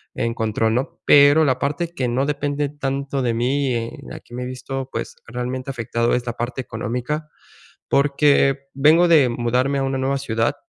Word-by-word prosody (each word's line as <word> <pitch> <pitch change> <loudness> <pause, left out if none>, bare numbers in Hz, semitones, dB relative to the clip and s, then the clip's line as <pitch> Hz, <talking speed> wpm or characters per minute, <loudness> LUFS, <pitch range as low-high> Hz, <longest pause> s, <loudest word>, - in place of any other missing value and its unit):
en 115 0 -1
control, 110 0 0
¿no? 130 - -3
Pero 145 +2 +6
la 130 -2 +2
parte 150 +4 -1
que 130 -5 -1
no 130 +3 0
depende 145 0 -1
tanto 140 -1 -3
de 120 -2 0
mí, 130 +3 0
en 115 0 -3 0.2
la - - -8
que 120 - -13
me 125 - -4
he - - -4
visto, 130 +1 -5
pues 115 - -5
realmente 125 +2 -4
afectado, 115 -1 -1
es 125 0 -2
la 120 - -3
parte 120 +2 -4
económica, 125 +7 -4 0.6
porque 140 -1 +3
vengo 155 +6 +5
de 150 -7 +5
mudarme 125 +4 0
a - - 0
una 135 0 -1
nueva 135 +1 0
ciudad, 115 -4 -1
130 Hz, 185 wpm, -21 LUFS, 120-140 Hz, 0.6 s, Pero